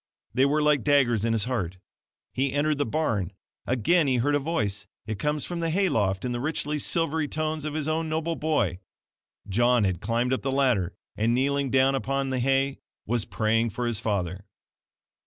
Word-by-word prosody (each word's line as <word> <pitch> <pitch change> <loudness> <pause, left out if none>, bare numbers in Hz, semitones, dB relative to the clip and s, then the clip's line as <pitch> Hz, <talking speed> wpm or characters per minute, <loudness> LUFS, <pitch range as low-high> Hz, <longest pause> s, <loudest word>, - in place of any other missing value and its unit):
They 130 +3 +4
were 150 +2 +2
like 150 -3 +3
daggers 130 -7 +3
in 115 0 +1
his 110 -3 +1
heart. 100 -8 -2 0.6
He 135 0 0
entered 145 0 +1
the 145 - +1
barn. 110 - -1 0.3
Again 140 +7 +3
he 130 -2 +2
hears 145 +5 +2
a - - +3
voice. 105 -10 -2 0.2
It 110 -2 -4
comes 150 +3 -1
from 175 -1 -4
the 165 -1 0
hay 190 +3 +2
loft, 100 - 0
in 125 - -1
the 120 - -2
rich 150 +4 -2 0.2
silvery 160 -1 0
tones 155 0 -2
of 155 0 -3
his 155 -1 -2
own 160 +1 -1
noble 160 +1 -1
boy. 150 - 0 0.7
John 120 +3 +3
had 95 -3 0
climbed 120 +4 0
up 130 - -1
the 135 - -1
ladder, 125 -10 +1 0.2
and 115 +3 +1
kneeling 140 +1 +1
down 135 +1 +4
upon 135 0 -1
the 130 - 0
hay 135 +2 +1 0.3
WAS 115 0 -1
PRAYING 115 +1 +1
FOR 120 +4 -3
HIS 120 -3 -1
FATHER. 100 -4 -2
130 Hz, 195 wpm, -26 LUFS, 115-150 Hz, 0.7 s, They